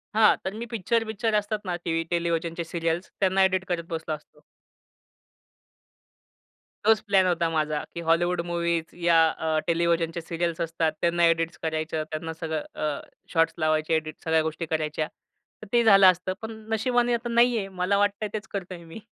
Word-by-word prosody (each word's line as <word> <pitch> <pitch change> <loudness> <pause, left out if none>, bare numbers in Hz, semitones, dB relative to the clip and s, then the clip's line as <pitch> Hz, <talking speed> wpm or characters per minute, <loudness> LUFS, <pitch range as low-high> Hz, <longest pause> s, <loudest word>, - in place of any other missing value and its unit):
हां, 220 -1 +6
तर 190 - -2
मी 225 +2 -5
पिक्चर-बिक्चर 225 0 0
असतात 210 +1 0
ना 180 -2 -1
टीव्ही, 165 -1 0
टेलिव्हिजनच्या 170 0 -1
सीरियल्स 165 +1 -2
त्यांना 190 0 +3
एडिट 190 0 +1
करत 175 -2 -1
बसलो 160 -1 -3
असतो. 150 - -19 2.5
तोच 220 -1 +5
प्लॅन 195 -2 +4
होता 170 -2 +1
माझा, 155 -2 -1
की 170 - -3
हॉलिवूड 175 +1 +2
मूव्हीज 170 -1 -1 0.2
या 170 -1 +5 0.2
अ, 160 -1 0
टेलिव्हिजनच्या 170 0 +1
सीरियल्स 170 0 -2
असतात, 165 -1 0
त्यांना 170 0 +3
एडिट्स 165 +1 +1
करायचं, 155 0 -2
त्यांना 160 +1 -4
सगळं 160 -2 -3 0.2
अ, 145 -2 -1 0.3
शॉट्स 165 -1 +3
लावायचे. 155 0 +1
एडिट 155 -1 -2
सगळ्या 160 0 +3
गोष्टी 160 +1 -3
करायच्या. 155 -1 -2 0.5
तर 215 - -10
ते 235 - +5
झालं 195 -3 +7
असतं. 185 +1 -4
पण 220 0 -5 0.2
नशिबाने 245 +2 +2
आता 235 +1 -2
नाहीये. 235 -3 +3
मला 190 +1 0
वाटतंय 205 +1 +1
तेच 215 -1 -4
करतोय 185 -3 -6
मी. 165 +6 -10
170 Hz, 160 wpm, -26 LUFS, 165-200 Hz, 2.5 s, झालं